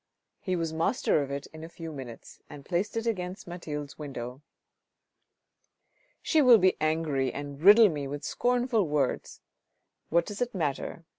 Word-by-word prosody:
He 185 -2 -2
was 165 -2 -2
master 165 - +1
of 140 - -4
it 140 0 -4
in 160 0 -10
a 165 - -8
few 165 -1 -8
minutes, 130 -6 -10
and 145 -2 -11
placed 190 +5 -1
it 225 - -2
against 185 -4 -3
Mathilde's 150 -5 -6
window. 130 -3 -6 1.1
" - - -44
She 315 - +3
will 250 -4 +8
be 185 -2 +3
angry 155 -4 0
and 145 +1 -7
riddle 210 +5 +8
me 145 -4 -4
with 145 +1 -6
scornful 245 -5 +1
words! 145 -3 -1 0.7
What 170 +1 +3
does 205 +3 -7
it 245 -3 -1
matter 160 0 -3
165 Hz, 160 wpm, -28 LUFS, 145-200 Hz, 1.1 s, will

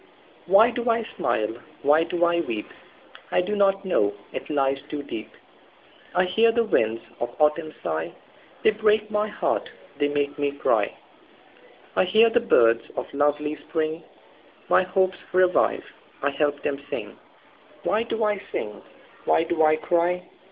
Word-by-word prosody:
Why 205 +6 +6
do 240 0 -2
I 230 0 +2
smile? 110 +1 -1 0.3
Why 150 +3 +5
do 175 +1 +1
I 170 0 +2
weep?I 115 +2 -5
do 205 +4 -2
not 195 -1 +2
know; 100 - +1 0.2
it - - -6
lies 135 -2 +1
too 145 -1 -4
deep.I 170 +9 -7
hear 225 +5 +3
the 235 0 +2
winds 115 - +1 0.2
of 120 - -4
autumn 155 +1 +2
sigh, 80 +1 -2 0.5
They 220 - +6
break 215 0 +1
my 210 0 +1
heart, 210 - -2 0.3
they 145 - +3
make 145 0 -2
me 145 -1 0
cry;I 115 - -3
hear 220 +5 +5
the 240 - +4
birds 115 - +3
of - - -5
lovely 145 +1 +1
spring, 160 0 -3 0.7
My - - +5
hopes 185 0 0
revive, 185 0 +3 0.4
I 140 - +2
help 145 0 0
them 140 -1 -2
sing. - - -5 0.7
Why 215 - +1
do 230 -1 -2
I 210 -2 0
sing? 105 -1 -4 0.4
Why - - +3
do 165 -1 -1
I 155 0 +5
cry? 175 +2 0
170 Hz, 145 wpm, -24 LUFS, 145-205 Hz, 0.7 s, Why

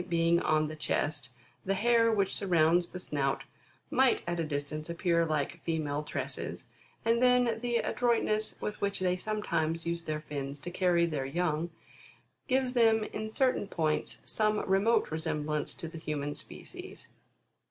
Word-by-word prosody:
being 170 0 +3
on 155 -2 +2
the 155 - -6
chest, 150 -4 -1 0.4
tfie 195 - +3
hair 230 +2 +4
which 200 -3 +1
surrounds 175 -2 +3
the - - -7
snout, 140 -6 -1 0.5
might 260 -1 +3
at 175 0 -2
a - - +1
distance 150 +1 -3
appear 170 -1 +1
like 155 +2 -1
female 150 -3 -1
tresses; 150 - -5 0.4
and 230 +1 +3
then 250 -2 +4
the 240 -1 +1
adroitness 225 -3 +1
with 210 - -4
which 200 0 0
they 180 -1 +2
sometimes 170 -5 -1
use 170 0 -1
their 155 -1 -2
fins 140 -2 -5
to 175 - -6
carry 175 -2 +3
their 145 -5 -2
young, 165 +1 0 0.8
gives 260 -1 +1
them 225 -3 +4
in 215 0 -3
certain 250 -2 +1
points, 155 -5 -1
some 215 -1 +1
remote 195 +4 +3
resem 155 -1 -2
blance 150 -1 -2
to 165 - -5
the 165 0 -8
human 145 -2 -3
species. - - -8
170 Hz, 155 wpm, -31 LUFS, 155-215 Hz, 0.8 s, hair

